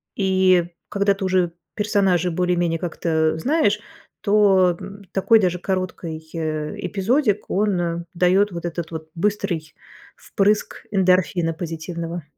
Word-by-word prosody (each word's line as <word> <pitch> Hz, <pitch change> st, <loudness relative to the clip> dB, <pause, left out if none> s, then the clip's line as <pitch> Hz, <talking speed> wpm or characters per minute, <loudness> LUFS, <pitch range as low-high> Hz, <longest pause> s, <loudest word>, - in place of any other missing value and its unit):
и, 185 Hz, -2 st, +3 dB, 0.2 s
когда 200 Hz, 0 st, +2 dB
ты 195 Hz, -1 st, -4 dB
уже 185 Hz, -2 st, +1 dB, 0.2 s
персонажа 195 Hz, -4 st, +2 dB
более-менее 175 Hz, -1 st, +1 dB
как-то 160 Hz, -2 st, 0 dB
знаешь, 230 Hz, -, +2 dB, 0.4 s
то, 195 Hz, -4 st, +4 dB
м, 200 Hz, +1 st, -10 dB
такой 220 Hz, +4 st, +4 dB
даже 180 Hz, -3 st, 0 dB
короткий, 175 Hz, -4 st, -4 dB
э, 155 Hz, -2 st, -3 dB
эпизодик, 210 Hz, +1 st, 0 dB
он 175 Hz, -4 st, 0 dB
даёт 185 Hz, +3 st, +3 dB
вот 170 Hz, -1 st, -6 dB
этот 170 Hz, -1 st, -4 dB
вот 160 Hz, -1 st, -7 dB
быстрый 175 Hz, -4 st, -1 dB, 0.4 s
впрыск 205 Hz, +1 st, 0 dB
эндорфина 180 Hz, -4 st, +2 dB
позитивного. 165 Hz, +1 st, -5 dB
180 Hz, 115 wpm, -22 LUFS, 170-200 Hz, 0.4 s, то